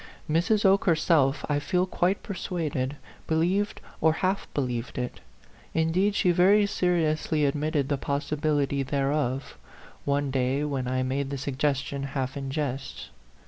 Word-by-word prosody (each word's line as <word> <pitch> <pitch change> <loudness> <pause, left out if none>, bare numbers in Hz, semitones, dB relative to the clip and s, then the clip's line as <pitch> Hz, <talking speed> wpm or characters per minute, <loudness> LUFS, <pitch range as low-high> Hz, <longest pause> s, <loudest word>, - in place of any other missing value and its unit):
Mrs. 190 +7 +2
Oke 195 +1 +4
herself, 155 -5 +3
I 145 -1 +1
feel 180 +5 +1
quite 185 +1 0
persuaded, 155 - -3 0.3
be 160 - +1
lieved 190 +6 +1 0.2
or 160 -1 +5
half 185 +4 -1
believed 125 -3 -3
it; 125 -1 -3 0.6
indeed, 175 +6 +2
she 180 - +3
very 190 +4 +5
A - - +3
PHANTOM 200 - -4
LOVER. - - +4
105 155 -2 0
seriously 150 -2 +2
admitted 145 0 0
the 140 -1 0
possibility 145 0 0
thereof, 135 - -1 0.4
one 140 -1 0
day 130 +2 +1
when 135 -4 -2
I 130 0 0
made 135 +2 -1
the 140 - -3
suggestion 140 +1 -1 0.2
half 130 -1 -2
in 135 -1 -4
jest. 135 - -4
145 Hz, 155 wpm, -27 LUFS, 135-170 Hz, 0.6 s, or